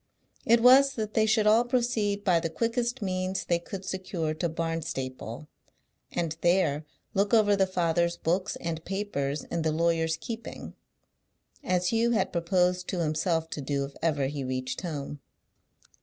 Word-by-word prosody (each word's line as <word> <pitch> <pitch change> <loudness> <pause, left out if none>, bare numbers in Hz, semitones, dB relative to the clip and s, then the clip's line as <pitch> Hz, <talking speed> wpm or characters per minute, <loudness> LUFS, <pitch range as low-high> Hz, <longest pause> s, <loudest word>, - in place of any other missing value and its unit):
It 230 0 +5
was 270 +2 +7
that 215 -2 -3
they 220 0 +3
should 215 -1 +3
all 220 +3 +5
proceed 235 -5 0
by 180 -4 +3
the 165 0 -2
quickest 235 +6 -1
means 185 0 -2
they 170 -1 +1
could 190 +2 -8
secure 185 -5 -3
to 170 +2 -2
Barnstaple, 155 -6 -4 0.6
and 165 -2 -2
there 170 -4 +2 0.3
look 200 +3 +2
over 205 -2 +5
the 190 -1 +2
father's 170 -1 +1
books 185 +5 -1
and 165 -1 -4
papers 155 -8 -2
in 170 - -3
the 160 0 +1
lawyer's 165 0 +1
keeping; 230 +4 -7 0.9
as 180 -7 +1
Hugh 230 +1 +2
had 220 - 0
proposed 180 +1 +1
to 185 - -2
himself 160 +1 0
to 150 - -4
do 140 0 -1
if 140 - -11
ever 145 -4 +1
he 140 0 -3
reached 130 0 -3
home. 145 -4 -5
175 Hz, 155 wpm, -28 LUFS, 160-205 Hz, 0.9 s, was